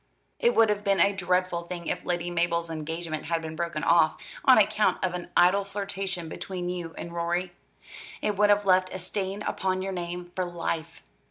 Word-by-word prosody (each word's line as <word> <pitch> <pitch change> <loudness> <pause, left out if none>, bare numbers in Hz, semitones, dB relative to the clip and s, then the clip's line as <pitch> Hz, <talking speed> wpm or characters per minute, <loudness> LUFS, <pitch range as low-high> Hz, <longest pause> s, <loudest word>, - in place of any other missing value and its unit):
It 475 0 +3
would 225 -1 +5
have 210 0 0
been 195 -2 +2
a 200 +3 +5
dreadful 180 -2 0
thing 170 0 -7
if - - -2
Lady 175 0 -2
Mabel's 170 -1 0
engagement 160 0 -4
had 165 -1 0
been 160 -1 -6
broken 170 -2 -3
off 165 -2 +4 0.3
on 260 - +7
account 215 0 +3
of 185 -1 +1
an 180 -1 -5
idle 190 +3 +5
flirtation 195 -3 -4
between 180 +2 -5
you 175 -2 -5
and 170 - -6
Rorie. 175 +1 -1 0.7
It 210 - -1
would 205 +1 +4
have 205 0 +4
left 185 -1 +4
a - - -4
stain 190 +2 -3
upon 185 -2 -1
your 195 0 -3
name 175 0 -5
for 185 - 0
life. 165 -2 -4
180 Hz, 190 wpm, -27 LUFS, 170-195 Hz, 0.7 s, on